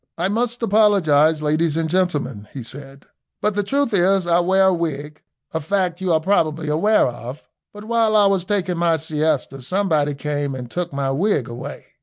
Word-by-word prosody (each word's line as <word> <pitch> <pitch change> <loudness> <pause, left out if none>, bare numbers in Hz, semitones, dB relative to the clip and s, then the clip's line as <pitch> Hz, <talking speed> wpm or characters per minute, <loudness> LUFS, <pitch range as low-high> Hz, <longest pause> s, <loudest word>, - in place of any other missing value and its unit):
"I 180 +3 0
must 235 +3 -1
apologise, 165 -8 +3
ladies 155 +1 +1
and 165 -1 0
gentlemen," 155 - -1
he 130 - -6
said, 135 +3 -10 0.3
"but 210 +1 0
the 205 - 0
truth 275 +4 -1
is, 190 0 +3
I 170 0 +3
wear 190 +2 +3
a - - +2
wig, 150 -3 -4 0.3
a 160 - -1
fact 180 +2 -1
you 185 -2 0
are 160 - +3
probably 160 -3 0
aware 205 +8 +3
of; 125 +3 -7 0.2
but 210 0 -11
while 225 -1 +1
I 210 -1 +5
was 195 -2 +2
taking 185 -3 -1
my 170 -1 +2
siesta 150 -3 -1
somebody 155 -2 0
came 145 -1 -3
and 125 -2 -8
took 175 -1 -3
my 140 -1 -2
wig 150 - 0
away. 120 0 -8
165 Hz, 185 wpm, -20 LUFS, 145-195 Hz, 0.3 s, I